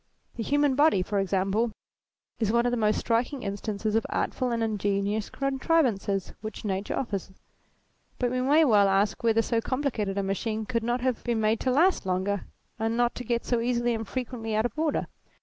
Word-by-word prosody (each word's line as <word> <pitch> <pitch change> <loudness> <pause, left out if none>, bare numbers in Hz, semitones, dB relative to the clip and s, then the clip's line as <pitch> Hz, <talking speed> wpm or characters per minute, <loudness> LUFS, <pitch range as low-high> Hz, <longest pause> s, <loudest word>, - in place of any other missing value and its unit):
The - - -4
human 290 +3 +2
body, 290 -9 +4
for 200 +2 -1
ex 195 -1 -2
ample, 200 +4 +1 0.7
is 220 -3 +1
one 235 +1 +2
of 245 - +2
the - - +1
most 215 -2 +2
striking 245 +4 0
instances 205 +1 -3
of 225 0 +2
artful 255 - -1
and 230 -1 0
ingenious 205 0 -1
contrivance 265 - 0
which 215 0 -7
nature 195 0 -2
offers, 200 -7 -3 0.9
but 245 -1 0
we 255 0 0
may 295 +5 +5
well 205 -6 +5
ask 200 +5 +1
whether 225 -1 +3
so 230 -1 0
complicated 230 -7 -2
a 200 - +1
machine 215 +3 -2
could 230 +1 -1
not 240 +2 -1
have 255 -2 -1
been 235 -2 0
made 215 +1 +2
to 260 - -1
last 320 - +3
longer, 190 +2 -1 0.3
and 225 +1 0
not 240 0 +2
to 250 - -6
get 235 -1 -1
so 240 - +1
easily 240 0 +1
and 225 -2 -4
frequently 240 -3 -4
out 215 +2 +2
of 240 - -2
order. 310 -1 0
225 Hz, 195 wpm, -27 LUFS, 205-250 Hz, 0.9 s, may